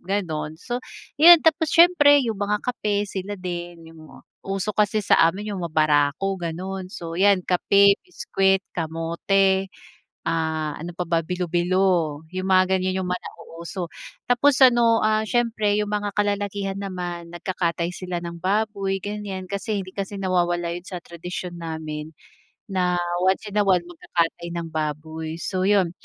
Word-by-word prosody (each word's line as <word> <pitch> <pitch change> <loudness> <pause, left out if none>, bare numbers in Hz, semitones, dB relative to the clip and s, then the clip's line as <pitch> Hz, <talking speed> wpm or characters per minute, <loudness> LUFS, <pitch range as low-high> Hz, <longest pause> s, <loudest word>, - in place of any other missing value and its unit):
ganun. 165 -5 -3
So, 240 +7 -4 0.4
yun. 340 0 +9
Tapos 320 0 +3
siyempre 290 -6 +6
yung 220 -3 -3
mga 205 +1 -1
kape, 210 -4 -1
sila 200 +1 -5
din, 175 -2 -7
yung 155 -2 -15 0.2
uso 195 +2 -2
kasi 210 0 +1
sa - - +4
amin 205 +4 -4
yung 190 - -4
mabarako, 155 +3 +1
ganun. 185 +3 -5
So, 165 -3 -7
yan, 195 -2 +4
kape, 200 +2 +4
biscuit, 195 - 0
kamote, 180 +4 0 0.6
ah, 160 -2 -1
ano 170 +1 -7
pa 180 - -2
ba, 165 0 +1
bilo-bilo 175 -3 0
yung 185 0 -3
mga 190 0 +4
ganiyan, 185 0 -1
yung 180 - -4
mga 180 - -1
nauuso. 170 +1 -8 0.4
Tapos 260 +3 +4
ano, 235 -2 +5
ah, 215 0 +1
siyempre 225 -4 +1
yung 210 0 -1
mga 205 -1 -2
kalalakihan 205 -1 -1
naman 175 -3 -5
nagkakatay 175 -1 -2
sila 180 -1 -5
ng 170 0 -7
baboy, 195 0 -1
ganiyan. 200 -2 -5
Kasi 200 0 -2
hindi 185 - -11
kasi 200 +1 -5
nawawala 175 -3 0
yun 175 +1 -7
sa 180 -2 -7
tradisyon 175 +1 -7
namin 160 -1 -6 0.6
na 180 -1 +1 0.2
once 190 +3 0
in 210 - 0
a - - +4
while 180 -3 +3
magkakatay 170 0 -2
ng 165 -1 -4
baboy. 155 +1 -4
So, 185 -1 -1
yun. 195 -4 +3
185 Hz, 150 wpm, -23 LUFS, 170-205 Hz, 0.6 s, yun